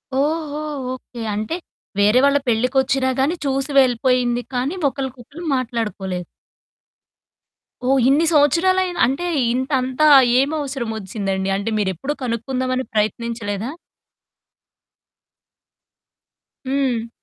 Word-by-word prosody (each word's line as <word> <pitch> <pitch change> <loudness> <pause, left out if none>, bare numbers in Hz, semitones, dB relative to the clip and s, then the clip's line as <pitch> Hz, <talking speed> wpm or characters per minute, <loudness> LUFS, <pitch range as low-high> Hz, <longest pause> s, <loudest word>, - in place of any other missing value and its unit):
ఓహో! 300 +1 -1 0.3
ఓకే. 245 -2 -9
అంటే, 215 +10 -2 0.4
వేరే 210 +5 +5
వాళ్ళ 280 0 +4
పెళ్ళికొచ్చినా 260 +3 +2
గానీ 295 +6 +2
చూసి 275 +1 -1
వెళ్ళిపోయింది, 245 -1 +2
కానీ 260 +8 -1
ఒకళ్ళకొకళ్ళు 270 +4 -7
మాట్లాడుకోలేదు. 210 -8 -3 1.6
ఓహ్! 270 0 +4
ఇన్ని 305 +4 +4
సంవత్సరాలయినా 350 +5 +3
అంటే, 275 +7 -2 0.3
ఇంతంతా 260 +2 +1 0.3
ఏమవసరమొచ్చిందండి? 220 - -2
అంటే, 205 +3 -3
మీరెప్పుడూ 200 - -2
కనుక్కుందామని 255 +2 -2
ప్రయత్నించలేదా? 215 0 -2 3.0
హ్మ్. 260 -4 0
255 Hz, 80 wpm, -20 LUFS, 230-280 Hz, 3.0 s, వేరే